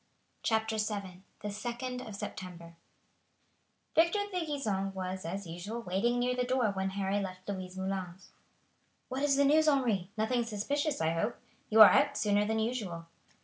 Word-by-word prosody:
CHAPTER 220 Hz, 0 st, 0 dB
VII 200 Hz, -4 st, -3 dB, 0.2 s
The 210 Hz, -, -3 dB
2d 240 Hz, +4 st, -4 dB
of 215 Hz, -, -7 dB
September 175 Hz, -4 st, -7 dB, 1.2 s
Victor 340 Hz, +6 st, +4 dB
de 350 Hz, -3 st, -1 dB
Gisons 200 Hz, -10 st, -2 dB
was, 185 Hz, -1 st, -4 dB
as 190 Hz, +4 st, -4 dB
usual, 175 Hz, +8 st, -6 dB
waiting 200 Hz, +6 st, +1 dB
near 250 Hz, +1 st, +1 dB
the 250 Hz, -, +1 dB
door 250 Hz, -3 st, +1 dB
when 190 Hz, 0 st, -1 dB
Harry 195 Hz, +1 st, 0 dB
left 185 Hz, -2 st, -6 dB
Louise 185 Hz, -2 st, -5 dB
Moulin's. 190 Hz, -1 st, -4 dB, 0.8 s
"What 260 Hz, +1 st, -3 dB
is 285 Hz, -1 st, +3 dB
the 280 Hz, +1 st, +4 dB
news, 310 Hz, +2 st, +4 dB
Henri? 235 Hz, -11 st, +2 dB
Nothing 235 Hz, +3 st, +1 dB
suspicious, 275 Hz, -, -1 dB
I 160 Hz, 0 st, +2 dB
hope? 210 Hz, +8 st, -1 dB, 0.3 s
You 220 Hz, 0 st, +6 dB
are 215 Hz, -, +12 dB
out 285 Hz, 0 st, +3 dB
sooner 205 Hz, -1 st, +2 dB
than 220 Hz, +1 st, 0 dB
usual." 215 Hz, -8 st, -2 dB
210 Hz, 160 wpm, -31 LUFS, 190-250 Hz, 1.2 s, are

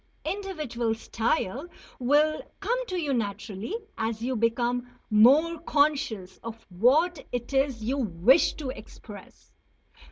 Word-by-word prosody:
Individual 305 Hz, -, -2 dB
style 230 Hz, -, -1 dB, 0.3 s
will 295 Hz, +5 st, +3 dB, 0.2 s
come 485 Hz, +5 st, -1 dB
to 365 Hz, -1 st, -2 dB
you 295 Hz, -4 st, -1 dB
naturally 210 Hz, -, -3 dB, 0.2 s
as 220 Hz, 0 st, -1 dB
you 250 Hz, +3 st, -2 dB
become 240 Hz, +2 st, 0 dB, 0.2 s
more 285 Hz, +10 st, +5 dB
conscious 285 Hz, -, 0 dB
of 230 Hz, 0 st, -8 dB
what 280 Hz, -, +3 dB
it 245 Hz, +2 st, -4 dB
is 270 Hz, -4 st, +1 dB
you 265 Hz, +5 st, -1 dB
wish 225 Hz, -, +3 dB
to 275 Hz, -4 st, -4 dB
express. 265 Hz, -, -13 dB
250 Hz, 120 wpm, -27 LUFS, 225-305 Hz, 0.3 s, more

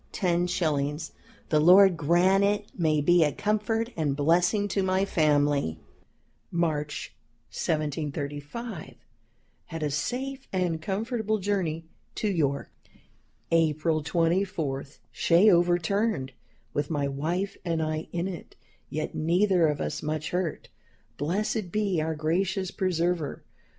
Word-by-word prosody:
_ 165 Hz, -5 st, 0 dB, 0.4 s
The 155 Hz, -, +3 dB
Lord 185 Hz, +3 st, +7 dB
grant 175 Hz, +5 st, +3 dB
it 205 Hz, +1 st, 0 dB
may 155 Hz, -4 st, +2 dB
be 175 Hz, +3 st, +5 dB
a 150 Hz, -, +2 dB
comfort 215 Hz, -, -1 dB
and 150 Hz, -4 st, 0 dB
blessing 175 Hz, +7 st, +2 dB
to 200 Hz, -, 0 dB
my 190 Hz, +1 st, +1 dB
family. 145 Hz, -, +2 dB, 0.7 s
"March, 150 Hz, -3 st, -2 dB, 0.4 s
1735. 150 Hz, -, -4 dB, 0.7 s
Had 165 Hz, -2 st, -6 dB
a 150 Hz, -, 0 dB
safe 260 Hz, -, -3 dB
and 180 Hz, -4 st, -1 dB
comfortable 220 Hz, +3 st, -1 dB
journey 180 Hz, -5 st, -1 dB, 0.3 s
to 215 Hz, -, -1 dB
York. 145 Hz, -8 st, 0 dB, 0.8 s
"April 160 Hz, -1 st, +2 dB
24. 165 Hz, -3 st, 0 dB, 0.3 s
Shay 180 Hz, +5 st, +4 dB
overturned, 175 Hz, -2 st, +1 dB, 0.4 s
with 145 Hz, 0 st, -1 dB
my 145 Hz, -3 st, 0 dB
wife 165 Hz, +8 st, -2 dB
and 165 Hz, -2 st, -1 dB
I 155 Hz, 0 st, -2 dB
in 175 Hz, +1 st, -2 dB
it, 180 Hz, -4 st, -8 dB, 0.3 s
yet 155 Hz, +1 st, -3 dB
neither 175 Hz, +2 st, +3 dB
of 150 Hz, -1 st, -1 dB
us -, -, -3 dB
much 155 Hz, 0 st, -3 dB
hurt. 180 Hz, -3 st, -2 dB, 0.5 s
Blessed 190 Hz, -, -1 dB
be 200 Hz, -5 st, 0 dB
our 160 Hz, +1 st, -2 dB
gracious 185 Hz, +4 st, -1 dB
Preserver! 175 Hz, -5 st, -1 dB
170 Hz, 115 wpm, -27 LUFS, 155-195 Hz, 0.8 s, Lord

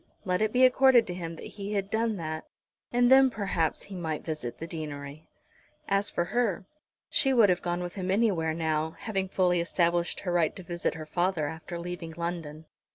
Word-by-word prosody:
Let 180 Hz, 0 st, 0 dB
it 215 Hz, 0 st, +2 dB
be 255 Hz, +2 st, +5 dB
accorded 255 Hz, -2 st, +6 dB
to 180 Hz, -, -5 dB
him 170 Hz, -2 st, -5 dB
that -, -, -9 dB
he 200 Hz, 0 st, -6 dB
had 200 Hz, -1 st, -2 dB
done 225 Hz, 0 st, +1 dB
that, 155 Hz, -2 st, -5 dB, 0.4 s
and 245 Hz, +1 st, +3 dB
then 265 Hz, 0 st, +8 dB
perhaps 195 Hz, -8 st, -1 dB
he 200 Hz, -, -9 dB
might 160 Hz, -4 st, -4 dB
visit 155 Hz, -7 st, -4 dB
the 165 Hz, -, -6 dB
deanery. 150 Hz, -2 st, -7 dB, 0.6 s
As 200 Hz, +1 st, +2 dB
for 175 Hz, -, -1 dB
her, 225 Hz, -7 st, +1 dB, 0.4 s
she 270 Hz, -1 st, +2 dB
would 225 Hz, -4 st, +6 dB
have 180 Hz, -1 st, +2 dB
gone 175 Hz, 0 st, -2 dB
with 175 Hz, -, -5 dB
him 190 Hz, -2 st, -4 dB
anywhere 185 Hz, -6 st, +2 dB
now, 160 Hz, -1 st, -1 dB
having 195 Hz, -4 st, -2 dB
fully 180 Hz, -2 st, +2 dB
established 170 Hz, 0 st, 0 dB
her 180 Hz, -, -2 dB
right 170 Hz, -3 st, +2 dB
to 185 Hz, -, -9 dB
visit 175 Hz, -1 st, -2 dB
her 155 Hz, -1 st, -7 dB
father 175 Hz, -1 st, 0 dB
after 160 Hz, +3 st, -6 dB
leaving 170 Hz, -1 st, -6 dB
London. 165 Hz, -3 st, -4 dB
175 Hz, 195 wpm, -28 LUFS, 160-200 Hz, 0.6 s, then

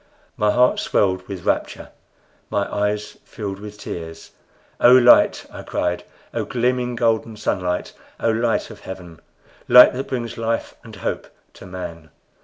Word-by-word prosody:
My 105 Hz, -, +1 dB
heart 125 Hz, +4 st, +3 dB
swelled 95 Hz, -2 st, 0 dB
with 95 Hz, -3 st, -7 dB
rapture, -, -, -2 dB, 0.6 s
my 100 Hz, -, 0 dB
eyes 105 Hz, 0 st, -2 dB
filled 100 Hz, -4 st, -6 dB
with 105 Hz, 0 st, -9 dB
tears. 80 Hz, -4 st, -8 dB, 0.5 s
"O 120 Hz, -, +7 dB
Light!" 125 Hz, -1 st, +6 dB
I -, -, -7 dB
cried; 90 Hz, 0 st, -2 dB, 0.3 s
"O -, -, -1 dB
gleaming, 125 Hz, 0 st, -1 dB
golden 115 Hz, -2 st, 0 dB
Sunlight! 90 Hz, -4 st, -2 dB, 0.3 s
O 115 Hz, -, +1 dB
Light 115 Hz, +1 st, 0 dB
of 105 Hz, -, -12 dB
Heaven! 90 Hz, -3 st, -10 dB, 0.5 s
light 125 Hz, +1 st, +9 dB
that 135 Hz, +2 st, -4 dB
brings 120 Hz, -3 st, -4 dB
life 115 Hz, 0 st, -2 dB
and -, -, -12 dB
hope -, -, -4 dB, 0.3 s
to -, -, -13 dB
man!" 85 Hz, -3 st, -8 dB
105 Hz, 145 wpm, -21 LUFS, 95-120 Hz, 0.6 s, light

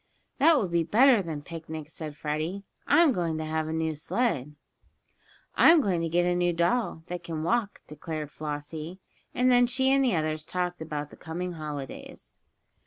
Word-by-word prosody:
"That 320 Hz, +4 st, +6 dB
will 205 Hz, -, +1 dB
be 170 Hz, -1 st, +1 dB
better 230 Hz, -, +5 dB
than 160 Hz, -5 st, -5 dB
picnics," 160 Hz, -1 st, -8 dB
said 155 Hz, -2 st, -7 dB
Freddie. 155 Hz, +6 st, -3 dB, 0.2 s
"I'm 335 Hz, -4 st, +5 dB
going 170 Hz, -7 st, -1 dB
to 155 Hz, -, -3 dB
have 155 Hz, 0 st, -2 dB
a -, -, -3 dB
new 160 Hz, 0 st, -1 dB
sled." 150 Hz, -, -1 dB, 1.0 s
"I'm 330 Hz, 0 st, +7 dB
going 190 Hz, -, 0 dB
to 165 Hz, -, -1 dB
get 175 Hz, +2 st, +2 dB
a 180 Hz, -, +2 dB
new 175 Hz, 0 st, +1 dB
doll, 170 Hz, 0 st, 0 dB
that 180 Hz, 0 st, -5 dB
can 160 Hz, -2 st, -4 dB
walk," 220 Hz, +3 st, 0 dB
declared 150 Hz, 0 st, -6 dB
Flossie, 155 Hz, +4 st, -6 dB, 0.4 s
and 250 Hz, +1 st, +3 dB
then 245 Hz, 0 st, +5 dB
she 260 Hz, +2 st, +2 dB
and 275 Hz, 0 st, +4 dB
the 245 Hz, -8 st, +2 dB
others 155 Hz, -1 st, -1 dB
talked 180 Hz, +1 st, -3 dB
about 150 Hz, -2 st, -5 dB
the -, -, -13 dB
coming 175 Hz, +3 st, -5 dB
holidays. 150 Hz, -5 st, -8 dB
165 Hz, 175 wpm, -27 LUFS, 155-200 Hz, 1.0 s, I'm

